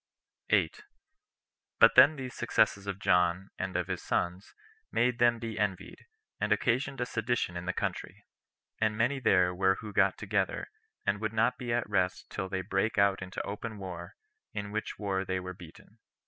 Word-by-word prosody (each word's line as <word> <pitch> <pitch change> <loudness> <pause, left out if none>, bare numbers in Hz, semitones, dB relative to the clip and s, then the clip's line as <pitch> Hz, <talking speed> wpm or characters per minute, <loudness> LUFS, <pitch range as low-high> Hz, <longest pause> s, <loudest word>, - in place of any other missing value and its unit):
8. 430 - +2 1.0
But - - +8
then 155 - +8
these 130 -3 -6
successes 100 0 +1
of 100 -1 -3
John 90 0 +2
and 95 -1 -2
of 90 - 0
his - - -4
sons 90 +3 -2 0.4
made 120 -1 +1
them 120 -1 +4
be 115 -1 -5
envied, 95 -3 -3 0.3
and 105 +1 -1
occasioned 125 +5 +1
a 125 - 0
sedition 115 -6 -1
in 85 +1 -5
the - - +2
country; - - -4 0.5
and 110 -1 +1
many 125 +5 +1
there 90 -7 +3
were 95 +1 +3
who 105 0 -8
got - - +3
together, - - -1 0.3
and 100 +1 0
would 110 -1 -2
not 115 +3 +2
be 120 -2 -3
at 120 0 0
rest 95 -3 -1
till 95 - -4
they 95 -1 -2
brake 95 +4 0
out 100 -1 +3
into 95 0 -5
open 105 +2 -5
war, 90 -3 -7 0.4
in 100 -1 -4
which 110 +1 -4
war 95 -2 -1
they 95 -1 -2
were 90 0 -6
beaten. 90 +5 -15
100 Hz, 175 wpm, -30 LUFS, 95-115 Hz, 1.0 s, But